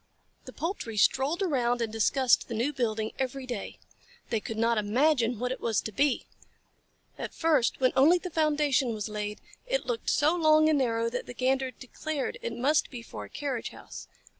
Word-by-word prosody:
The - - -9
poultry 320 - -4
strolled 280 - +2
around 245 -8 +1
and 225 -2 -2
discussed 245 +3 +3
the 230 - -4
new 250 +7 0
building 220 -4 -1
every 265 0 -2
day. 240 -5 -5 0.5
They 225 - +1
could 220 +1 -6
not 230 0 +2
imagine 240 +2 +2
what 250 +3 -2
it 260 - -5
was 225 -3 +1
to 220 - -6
be. 280 +6 +1 0.9
At - - -5
first, 305 -7 +2
when 255 -1 +3
only 310 +7 +6
the 360 0 -7
foundation 295 -6 +1
was 210 0 -4
laid, 210 0 -4 0.3
it - - 0
looked 470 -2 -2
so 305 +4 +3
long 310 -2 +5
and 300 -2 +3
narrow 230 -3 +1
that 250 - -4
the 245 - -8
Gander 265 +1 +1
declared 270 +3 -5
it 235 0 -4
must 285 +5 +2
be 240 -3 -8
for - - -8
a - - -14
carriage 275 -5 -3
house. - - -11
255 Hz, 190 wpm, -28 LUFS, 230-295 Hz, 0.9 s, only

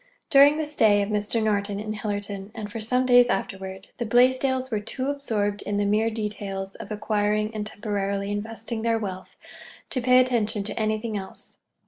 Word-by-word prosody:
During 285 +1 +7
the 315 - -1
stay 215 -9 +3
of 200 - -4
Mr. 210 +2 0
Norton 205 -1 0
in 215 0 -4
Hillerton, 205 -2 -4
and 210 -2 -6
for 225 - -5
some 250 +4 +1
days 245 -1 +6
afterward, 190 -1 -4
the 240 - -1
Blaisdells 260 +2 +3
were 215 - 0
too 255 +6 -3
absorbed 210 -8 -2
in 205 - -2
the 205 - +1
mere 215 +2 +2
details 205 -3 -4
of - - -10
acquiring 210 0 0
and 210 -1 -4
temporarily 200 -2 -2
investing 225 +2 -4
their 230 0 +1
wealth 190 -4 -6 0.5
to 255 - -1
pay 250 +1 +5
attention 225 -4 +1
to 210 - -5
anything 215 0 -1
else. 190 -1 -8
215 Hz, 175 wpm, -25 LUFS, 205-235 Hz, 0.5 s, During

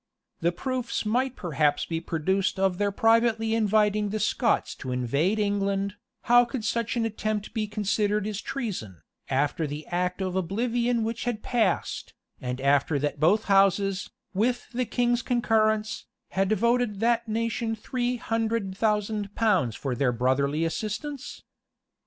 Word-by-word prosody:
Though 170 - +2
proofs 250 +6 -3
might 250 +4 0
perhaps 150 -4 +1
be 165 -1 -3
produced 185 +5 0
of 190 -1 +1
their 205 -1 +1
privately 225 +1 +3
inviting 210 -1 +2
the 215 +2 -2
Scots 220 +2 +1
to 130 - -5
invade 140 - +1
England, 200 -1 0 0.3
how 245 +1 +6
could 240 -2 -4
such 230 +1 -1
an 230 - +1
attempt 215 -1 -3
be 220 -2 -1
considered 210 0 0
as 210 -1 -3
treason, 175 - -5 0.3
after 145 +4 0
the 145 +1 -6
act 180 +1 -1
of 185 -1 -2
oblivion 235 +5 0
which 230 +2 -3
had 240 -3 -2
passed, 220 -7 -1 0.3
and 125 0 -3
after 140 +2 +2
that 145 +1 -2
both 200 +8 +4
houses, 195 0 +3 0.2
with 240 +5 0
the 250 +1 0
king's 240 0 +1
concurrence, 220 -3 +1 0.2
had 195 +1 0
voted 235 0 +1
that 235 0 +2
nation 230 +1 -1
three 245 +3 -2
hundred 225 -4 -1
thousand 210 -1 -1
pounds 185 - +2
for 135 -3 -3
their 125 +1 +1
brotherly 140 +6 +1
assistance? 220 - -4
210 Hz, 145 wpm, -26 LUFS, 180-230 Hz, 0.3 s, how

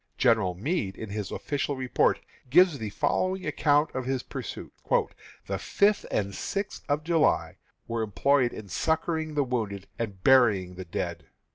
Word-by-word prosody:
General 110 -8 +3
Meade, 105 - -2
in 110 - -6
his 105 -1 -3
official 145 0 -2
report, 130 -1 +1 0.3
gives 170 0 +5
the 110 - -3
following 185 - 0
account 150 0 +2
of 130 -1 -3
his 130 -1 -1
pursuit: - - -7 0.7
"The 95 -1 -3
fifth 200 - +2
and 100 -1 -1
sixth 200 - -4
of 145 +1 +1
July 165 -1 +2 0.3
were 115 0 -2
employed 125 +4 +2
in 110 - -8
succoring 160 - -1
the 145 - +3
wounded 110 -6 -3
and 100 -5 -4
burying 105 -9 +4
the 95 0 -8
dead. 85 - -4
125 Hz, 150 wpm, -27 LUFS, 100-155 Hz, 0.7 s, gives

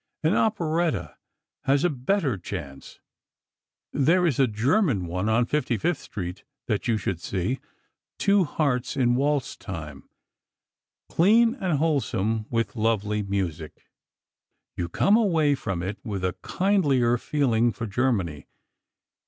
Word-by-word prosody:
An 160 +4 +3
operetta 170 -7 0 0.5
has 135 +1 +3
a 175 - +4
better 140 - 0
chance. 85 -7 -8 0.9
There 165 +6 +3
is 150 -7 +1
a 135 - +5
German 120 - +1
one 90 +5 -2
on 115 +2 +3
55th 150 - 0
Street 90 -2 -6 0.2
that 105 -3 -1
you 115 -2 +2
should 90 -4 -3
see—'Two 130 - -2
Hearts 140 -3 -1
in 120 -2 +3
Waltz 140 +1 0
Time'—clean 170 - -2
and 190 - -1
wholesome, 115 -8 0
with 115 0 -1
lovely 105 -2 0
music. 90 -6 -4 0.8
You 85 -1 -3
come 200 - +3
away 165 -10 +3
from 95 -10 -3
it 95 +3 -4
with 100 -5 -3
a 90 - 0
kindlier 140 - +2
feeling 120 -6 +1
for 115 - -5
Germany. 100 - -1
120 Hz, 120 wpm, -25 LUFS, 100-155 Hz, 0.9 s, a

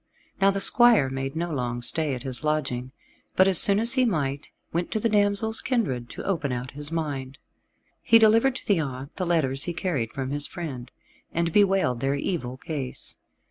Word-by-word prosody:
Now 195 - +5
the 195 0 -1
squire 230 - +5
made 135 +1 -4
no 170 +1 -3
long 120 -4 -3
stay 150 0 0
at 125 - -8
his 130 0 -5
lodging, 130 -5 -2 0.4
but 185 - +5
as 190 -3 +5
soon 200 0 +6
as 230 +2 +5
he 260 -1 +2
might, 145 - -2 0.2
went 170 +1 -1
to 220 - 0
the 230 - +1
damsel's 205 +1 +2
kindred 135 - -2
to - - -8
open 160 -8 -1
out 125 0 -4
his 145 +1 -6
mind. 140 -5 -4 0.6
He 230 - +5
delivered 225 +4 +4
to - - -6
the 200 -5 +2
aunt 135 -2 -5
the 185 - -2
letters 140 -6 +1
he 175 - -3
carried 140 - -2
from 135 -1 -5
his 145 0 -1
friend, 140 -9 -7 0.4
and 170 -1 -1
bewailed 195 - +2
their 135 +2 0
evil 140 -4 -3
case. 135 -2 -6
155 Hz, 190 wpm, -25 LUFS, 135-195 Hz, 0.6 s, soon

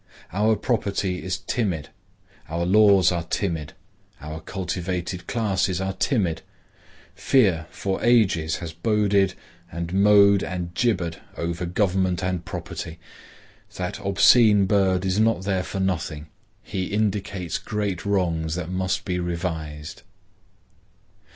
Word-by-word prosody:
Our 105 +3 +3
property 100 -4 -1
is 95 -1 -2
timid, 95 - -2 0.6
our 85 +2 -1
laws 100 -1 +5
are 85 -1 -1
timid, 80 -2 -3 0.5
our 75 +2 -7
cultivated 90 0 -4
classes 95 -5 0
are 95 0 -2
timid. 95 - 0 0.7
Fear 95 -12 +2
for 95 -1 -3
ages 95 -10 +3
has 85 -2 -6
boded 100 0 +2 0.4
and 85 +1 -5
mowed 100 0 +6
and 90 -2 -4
gibbered 90 -8 0 0.2
over 85 +1 -3
government 95 -1 0
and 90 -1 -1
property. 85 -1 -6 0.8
That 90 +2 -4
obscene 100 +1 +5
bird 95 -2 +2
is 95 +2 +1
not 110 -4 +2
there 95 -1 0
for 95 - -5
nothing. 85 -5 -2 0.4
He 95 -1 -3
indicates 100 -4 -2
great 105 -4 -3
wrongs 85 -5 0
which 90 -2 -4
must 95 0 -1
be 90 -2 -1
revised. 80 -3 -4
95 Hz, 120 wpm, -24 LUFS, 85-100 Hz, 0.8 s, mowed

